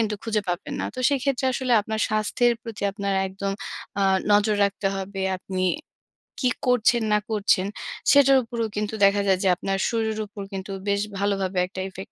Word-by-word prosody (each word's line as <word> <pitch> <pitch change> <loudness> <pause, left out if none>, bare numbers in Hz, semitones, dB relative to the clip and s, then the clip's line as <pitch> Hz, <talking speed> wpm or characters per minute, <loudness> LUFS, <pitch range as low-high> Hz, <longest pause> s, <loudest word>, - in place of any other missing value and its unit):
কিন্তু 215 -2 0
খুঁজে 220 -2 0
পাবেন 175 +2 -3
না। - - -2
তো - - -9
সেক্ষেত্রে 275 -1 0
আসলে 255 0 -1
আপনার 220 +1 -3
স্বাস্থ্যের 215 +3 +2
প্রতি 225 -3 -8
আপনার 200 -1 -2
একদম 195 +1 -4 0.5
আ - - +3 0.3
নজর 210 0 +4
রাখতে 200 0 -1
হবে, 195 0 -4 0.2
আপনি 185 0 -4 0.8
কি 255 - +3 0.2
করছেন 240 -1 +3
না 210 - +4
করছেন 200 -2 +2 0.4
সেটার 275 -1 +6
উপরেও 230 -1 -3
কিন্তু 210 +1 -2
দেখা 200 +1 +4
যায় 190 -1 +3
যে, - - +2
আপনার 195 +2 -2
শরীরের 220 -2 -1
উপর 205 0 -9
কিন্তু 190 +1 -5 0.2
বেশ 200 0 +1 0.2
ভালোভাবে 195 -2 -1
একটা 190 - -8
effect 190 0 -10
205 Hz, 175 wpm, -24 LUFS, 195-230 Hz, 0.8 s, সেটার